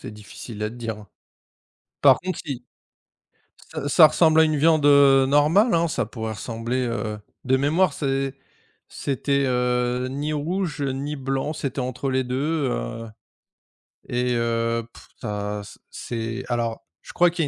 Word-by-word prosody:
c'est - - -8
difficile 105 +1 -9
à 105 - -1
te - - -11
dire, 115 -3 -5
hein, 105 -2 -14 0.9
par 135 -2 +6
contre 185 0 -4
i 125 -4 -5 1.1
ça 150 -3 -3
ça 155 +1 +8
ressemble 160 +1 +4
à - - +7
une 155 -1 +1
viande, 155 0 +3
heu, 140 -2 +6
normale, 155 - +4
hein. 170 0 +3
Ça 135 -6 -1
pourrait 110 -1 -5
ressembler, 115 +4 -3
heu, 110 -2 -3 0.3
de 130 0 +3
mémoire 155 +7 +2
c'est 135 -1 -1 0.5
c'était, 140 0 -1
heu, 125 0 0
ni 145 +3 -3
rouge, 160 +2 -2
heu, 140 - 0
ni 140 +3 -4
blanc, 135 +2 -2
c'était 140 -3 -4
entre 130 +2 -3
les 130 0 +1
2, 140 +3 -1
heu - - -4 1.0
et 125 0 0
heu, 115 0 0
pff, - - -15
ça 105 0 -3
ç - - -13
c'est 115 +1 -5
alors, 115 -3 -2 0.2
je - - -12
crois 175 0 +4
qu'il 170 0 -2
y - - -2
130 Hz, 165 wpm, -23 LUFS, 115-150 Hz, 1.1 s, ça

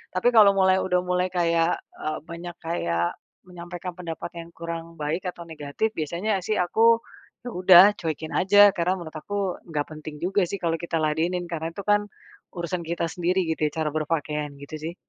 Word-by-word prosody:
Tapi 240 +7 +3
kalau 205 -4 +7
mulai 190 -1 +4
udah 180 -1 +1
mulai 180 0 0
kayak 170 -2 +1 0.2
e - - -11 0.2
banyak 170 +1 -8
kayak 85 - -1 0.2
menyampaikan 180 0 -7
pendapat 170 -1 -6
yang 165 0 -9
kurang 165 0 -6
baik 160 +4 -3
atau 175 -1 -6
negatif, 160 +6 -3
biasanya 180 +5 -1
sih 210 +4 -2
aku, 230 +5 +3 0.4
ya 245 - -5
udah 180 -1 +8 0.2
cuekin 160 -1 -4
aja. 205 +2 +6
Karena 180 0 0
menurut 170 -4 -8
aku 200 +1 -3
nggak 150 -3 -2
penting 155 0 -8
juga 195 0 +1
sih 200 - -3
kalau 165 -1 0
kita 170 -1 -4
ladenin, 165 +4 0
karena 165 0 -4
tuh 200 - -6
kan 205 0 +3 0.5
urusan 175 +1 -3
kita 170 0 -1
sendiri, 180 +2 0
gitu 155 -1 0
ya, - - -5
cara 150 - 0
berpakaian, 150 -2 -2
gitu 140 +2 -9
sih. 165 +3 -5
170 Hz, 180 wpm, -25 LUFS, 160-185 Hz, 0.5 s, udah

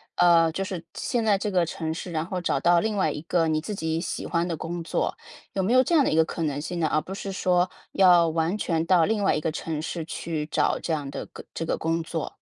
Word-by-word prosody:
呃， 165 -2 +5
就 195 +4 -2
是 185 -3 -5
现 240 -3 -1
在 205 -3 +3
这 205 +1 -3
个 180 -2 +3
城 160 -1 -3
市， 175 +1 -6
然 155 0 -1
后 185 0 -4
找 140 - 0
到 170 +3 +4
另 215 +1 -1
外 190 - +2
一 150 - -5
个 165 0 +1
你 155 -1 +1
自 205 +5 -5
己 160 -2 -2
喜 - - -4
欢 170 0 0
的 165 -3 -3
工 170 +1 -5
作。 - - -1 0.4
有 195 - 0
没 195 +5 0
有 255 +1 +6
这 340 - -1
样 300 -4 +6
的 - - +1
一 - - 0
个 160 - +5
可 165 - -5
能 145 -2 -1
性 170 +3 -4
呢？ 160 - +2
而 155 - +2
不 190 - -7
是 195 0 -5
说 180 -1 +2 0.2
要 180 -3 +6
完 165 +5 0
全 165 -5 0
到 175 -3 +5
另 215 -1 0
外 - - +3
一 - - 0
个 155 +1 -1
城 160 -1 -4
市 165 +1 -4
去 160 -2 -4
找 - - +1
这 165 - -3
样 145 -3 -2
的 - - -6
个 - - -12
这 165 - -3
个 - - -1
工 165 +1 0
作。 160 - -5
170 Hz, 295 characters per minute, -25 LUFS, 160-185 Hz, 0.4 s, 有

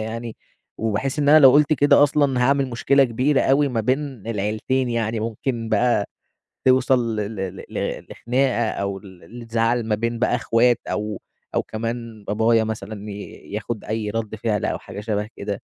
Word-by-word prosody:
يعني 115 +1 -5 0.4
وباحِس 115 +6 -1
إن 145 -1 +2
أنا 155 +2 +8
لو 135 -3 +8
قُلت 150 +2 +4
كده 145 -1 +5
أصلًا، 145 -3 +2
هاعمل 135 +1 +2
مشكلة 135 +3 +3
كبيرة 130 +4 +1
أوي 140 +2 +3
ما 120 -4 -1
بين 130 +5 +1 0.3
العيلتين، 110 +4 -1
يعني 115 -1 -1
ممكن 115 +1 -3
بقى 110 -1 +2 0.6
توصل 130 -3 +3
ل - - -1 0.2
ل 95 -1 -5
ل - - -4
لخناقة 125 -1 0
أو 100 -1 -3
ل 95 +3 -13
لزعل 115 +1 0
ما 105 - +2
بين 115 +2 -2
بقى - - +1
إخوات 120 +1 +2
أو 105 0 -3 0.3
أو - - +2
كمان 115 -1 -5
بابايا 110 +2 +2
مثلًا 105 -1 -6
ي - - -6 0.4
ياخُد 110 +1 -4
أي 110 -1 -3
رَد 110 0 -3
فِعل 110 -2 -1
أو - - -1
حاجة - - -9
شَبه 105 -1 -2
كده، - - -5
115 Hz, 165 wpm, -22 LUFS, 110-130 Hz, 0.6 s, أنا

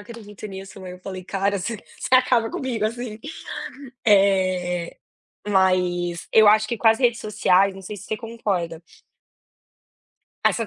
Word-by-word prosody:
acredito 215 -2 -10
nisso, 195 0 -9
mãe". 185 -1 -8
Eu 180 - -11
falei: 185 0 -7
"Cara, 195 +1 0
você 230 +5 -3 0.2
você 260 - +1
acaba 250 -3 +3
comigo 240 -5 -2
assim". 230 -1 -5 0.9
Eh, 185 -4 +2 0.5
mas 180 -3 +1
eu 220 -1 +7
acho 215 +1 +5
que 235 - -1
com - - -1
as 225 - +4
redes 240 -3 +2
sociais, 200 -2 +2
não 195 - -10
sei 205 +3 -7
se 205 - -10
você 220 - -3
concorda 200 -8 -3 1.6
Essa 230 - +2
200 Hz, 145 wpm, -23 LUFS, 185-225 Hz, 1.6 s, eu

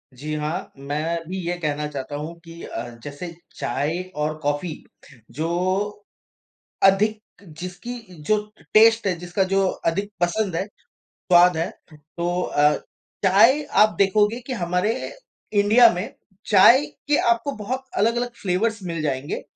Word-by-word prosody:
जी 150 +4 -5
हाँ। 155 +5 -3
मैं 150 +4 -2
भी 190 - -3
ये 175 - 0
कहना 150 -2 -2
चाहता 145 0 -6
हूँ 155 +3 -5
कि 165 0 -11
अ, 120 - -6
जैसे 145 +4 -7 0.2
चाय 150 +8 -2
और 155 +1 -2
कॉफ़ी 145 +3 -1 0.6
जो 160 - 0 1.4
अधिक 210 +3 +4 0.2
जिसकी 180 +8 -8 0.3
जो 215 +6 +3 0.4
टेस्ट 225 0 +6
है, 185 - +2
जिसका 175 +2 -1
जो 195 0 +1 0.2
अधिक 200 +5 0
पसंद 175 0 0
है, 190 - 0 0.5
स्वाद 175 -1 +4
है, 165 - -1 0.2
तो 170 +4 -4
अ, 150 -2 +3 0.5
चाय 225 +10 +5
आप 215 0 +4
देखोगे 210 +4 +3
कि 260 - -2
हमारे 180 +2 0 0.7
इंडिया 225 +3 +7
में 180 +3 -4 0.4
चाय 235 +8 +7 0.2
के 295 - +3
आपको 235 +5 +1
बहुत 255 +5 -4
अलग-अलग 240 +4 +1
फ़्लेवर्स 210 +4 0
मिल 165 -3 -3
जाएँगे। 140 -1 -2
180 Hz, 135 wpm, -23 LUFS, 155-215 Hz, 1.4 s, इंडिया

